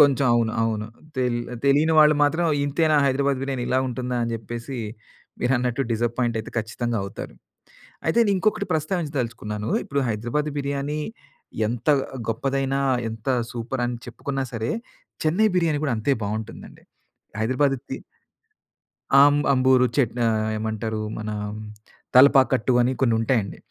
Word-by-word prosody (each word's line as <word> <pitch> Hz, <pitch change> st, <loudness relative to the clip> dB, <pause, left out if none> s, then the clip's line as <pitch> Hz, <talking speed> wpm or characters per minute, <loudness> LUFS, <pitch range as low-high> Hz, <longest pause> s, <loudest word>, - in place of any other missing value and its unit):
కొంచెం 140 Hz, -1 st, +5 dB
అవును. 115 Hz, -1 st, +1 dB
అవును. 110 Hz, -1 st, -1 dB, 0.3 s
తెలి 125 Hz, -2 st, +1 dB, 0.3 s
తెలియని 145 Hz, +4 st, +4 dB
వాళ్ళు 150 Hz, 0 st, +7 dB
మాత్రం, 160 Hz, +4 st, +2 dB, 0.2 s
"ఇంతేనా! 155 Hz, +2 st, +2 dB
హైదరాబాద్ 140 Hz, 0 st, +1 dB
బిర్యానీ 135 Hz, -2 st, -2 dB
ఇలా 130 Hz, -, +2 dB
ఉంటుందా" 125 Hz, 0 st, -3 dB
అని 115 Hz, -, -1 dB
జెప్పేసి 120 Hz, +4 st, -6 dB, 0.6 s
మీరన్నట్టు 125 Hz, +1 st, +1 dB
డిసప్పాయింటయితే 115 Hz, 0 st, -1 dB
ఖచ్చితంగా 115 Hz, +1 st, -2 dB
అవుతారు. 100 Hz, +1 st, -7 dB, 0.7 s
అయితేనింకొకటి 200 Hz, +1 st, +2 dB
ప్రస్తావించదలుచుకున్నాను, 130 Hz, -, -2 dB
ఇప్పుడు 140 Hz, 0 st, -1 dB
హైదరాబాది 120 Hz, +8 st, -2 dB
బిర్యానీ 140 Hz, +2 st, -2 dB, 0.7 s
ఎంత 120 Hz, +5 st, -4 dB, 0.4 s
గొప్పదైనా, 135 Hz, +4 st, 0 dB, 0.3 s
ఎంత 110 Hz, +2 st, -7 dB, 0.2 s
సూపరని 120 Hz, 0 st, -3 dB
చెప్పుకున్నా 135 Hz, +3 st, -4 dB
సరే 115 Hz, 0 st, -2 dB, 0.5 s
చెన్నై 185 Hz, +8 st, +3 dB
బిర్యానీ 160 Hz, -4 st, +1 dB
కూడా 135 Hz, -, +1 dB
అంతే 135 Hz, +6 st, +1 dB
బావుంటుందండి. 110 Hz, +2 st, -6 dB, 0.6 s
హైదరాబాద్ 135 Hz, +4 st, +2 dB
తి -, -, -2 dB, 1.2 s
అం 145 Hz, +1 st, +7 dB, 0.2 s
అంబూరు 130 Hz, -1 st, +4 dB
చటా 120 Hz, -3 st, +1 dB, 0.3 s
ఏమంటారు 110 Hz, 0 st, -3 dB, 0.2 s
మన 110 Hz, -1 st, -4 dB, 0.9 s
తలపాకట్టు 130 Hz, -2 st, +6 dB
అని 125 Hz, +2 st, +2 dB
కొన్ని 115 Hz, -3 st, +3 dB
ఉంటాయండి. 115 Hz, -3 st, 0 dB
130 Hz, 115 wpm, -24 LUFS, 115-140 Hz, 1.2 s, వాళ్ళు